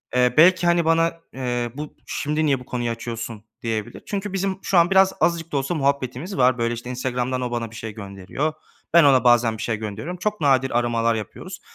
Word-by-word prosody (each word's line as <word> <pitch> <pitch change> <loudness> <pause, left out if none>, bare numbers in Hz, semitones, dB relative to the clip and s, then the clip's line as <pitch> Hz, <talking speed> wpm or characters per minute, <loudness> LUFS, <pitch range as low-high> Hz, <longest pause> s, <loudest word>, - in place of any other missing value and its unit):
Eee, 125 -1 +3
belki, 175 +2 +6
hani, 170 -1 +3
bana, 165 +1 +2 0.2
eee, 120 -2 -2
"Bu 150 +1 -7
şimdi 150 +2 -1
niye 140 -3 +2
bu 125 - -12
konuyu 120 -2 -2
açıyorsun?" 115 -1 -6 0.2
diyebilir. 110 -2 -4
Çünkü 200 -1 -4
bizim 195 0 -1
şu 190 - +1
an 170 0 +5
biraz, 190 0 +5
azıcık 165 -1 +1
da 145 - 0
olsa 135 +5 -1
muhabbetimiz 140 +4 -1
var. 130 -1 +4
Böyle, 115 0 0
işte, 120 +1 -7
Instagram'dan 125 0 -2
o, 125 -1 -3
bana 115 -2 -3
bir - - -12
şey 110 -1 -6
gönderiyor. 100 +9 -4 0.4
Ben, 170 -1 +8
ona 135 -3 +5
bazen 120 -2 +4
bir - - -7
şey 110 -2 -1
gönderiyorum. 110 - -5
Çok 210 +2 -2
nadir 135 -4 +3
aramalar 115 -1 +1
yapıyoruz. 110 -3 -7
130 Hz, 205 wpm, -23 LUFS, 120-165 Hz, 0.4 s, Ben